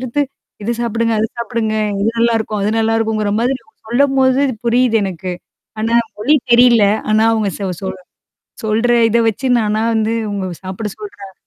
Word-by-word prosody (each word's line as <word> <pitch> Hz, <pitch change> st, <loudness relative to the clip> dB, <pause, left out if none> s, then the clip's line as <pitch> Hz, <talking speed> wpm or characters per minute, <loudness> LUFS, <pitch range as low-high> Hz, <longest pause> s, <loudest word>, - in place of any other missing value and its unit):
எடுத்து 255 Hz, +3 st, -1 dB, 0.4 s
இத 225 Hz, -, -2 dB
சாப்பிடுங்க, 230 Hz, -1 st, 0 dB
அத 220 Hz, -, +1 dB
சாப்பிடுங்க. 225 Hz, -1 st, -2 dB, 0.3 s
இது 205 Hz, -, +1 dB
நல்லாயிருக்கும். 225 Hz, -2 st, +1 dB
அது 210 Hz, -, +1 dB
நல்லாிருக்குங்கிற 220 Hz, -2 st, 0 dB
மாதிரி 250 Hz, +3 st, +1 dB, 0.3 s
சொல்லும்போது 265 Hz, +1 st, +3 dB
இது 260 Hz, -, -2 dB
புரியுது 240 Hz, 0 st, +3 dB
எனக்கு. 185 Hz, -1 st, -4 dB, 0.5 s
ஆனா 230 Hz, +2 st, +1 dB, 0.2 s
மொழி 260 Hz, +9 st, +3 dB, 0.2 s
தெரியல. 235 Hz, -3 st, +6 dB, 0.3 s
ஆனா 215 Hz, +1 st, +4 dB
அவங்க 220 Hz, -2 st, 0 dB
ச -, -, -17 dB, 0.2 s
சொல் 190 Hz, -1 st, -4 dB, 0.7 s
சொல்ற. 225 Hz, +3 st, +1 dB, 0.2 s
இத 230 Hz, +1 st, +2 dB
வச்சு 225 Hz, +5 st, -3 dB
நானா 215 Hz, -1 st, 0 dB
வந்து 220 Hz, 0 st, +1 dB, 0.2 s
உங்க 200 Hz, -2 st, -3 dB, 0.2 s
சாப்பிட 190 Hz, +3 st, -5 dB
சொல்றேன். 205 Hz, -2 st, -10 dB
225 Hz, 150 wpm, -17 LUFS, 210-235 Hz, 0.7 s, தெரியல